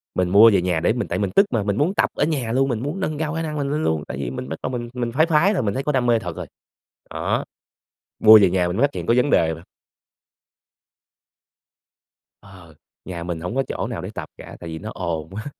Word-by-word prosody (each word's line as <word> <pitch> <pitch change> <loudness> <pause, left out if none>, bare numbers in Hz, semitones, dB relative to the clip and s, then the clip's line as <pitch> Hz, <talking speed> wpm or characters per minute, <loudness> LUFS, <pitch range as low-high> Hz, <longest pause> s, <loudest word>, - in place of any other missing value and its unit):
Mình 90 -1 +1
mua 105 +5 +8
về 95 - +3
nhà 90 -2 0
để 85 +6 +1
mình 120 - -3
tại 90 - -2
mình 100 -2 -1
tức 195 - +6
mà, 115 -4 0
mình 100 0 -1
muốn 155 +8 +1
tập - - +1
ở - - 0
nhà 140 -8 -2
luôn, 135 +3 +1
mình 120 -4 -1
muốn 150 +7 -4
nâng 155 -5 -2
cao 150 -1 -2
khả 165 - -2
năng 155 -2 -4
mình 140 -1 -2
lên 155 +2 -1
luôn, 80 -2 0
tại - - -6
vì - - -3
mình 65 +1 -6
bắt 80 - -5
đầu - - -1
mình 120 -2 -4
mình 120 -2 -3
phái 155 +6 +3
phái 170 +5 +3
rồi, 180 - -1
mình 100 -2 -1
thấy 135 - -3
có 150 - 0
đam 130 -3 0
mê 120 -1 +3
thật 90 -5 -6
rồi. - - -7 0.6
Đó, - - -2 0.8
mua 110 0 +9
về 95 -3 +4
nhà 90 -1 +1
mình 90 - -3
mới 120 - +1
phát 145 - -11
hiện - - -5
có 115 - +3
vấn 125 +3 +2
đề 80 - +3
bạn. 80 - -12 2.8
Ờ, 95 -5 -16 0.3
nhà 85 -2 -6
mình 85 -1 -4
hổng 90 +7 -4
có 135 - +1
chỗ - - -3
nào - - -5
để - - -6
tập - - -6
cả - - -11
tại 85 - -8
vì 80 0 -6
nó - - -7
ồn 80 -2 -4
quá, 105 +4 -7
110 Hz, 265 wpm, -22 LUFS, 90-140 Hz, 2.8 s, mua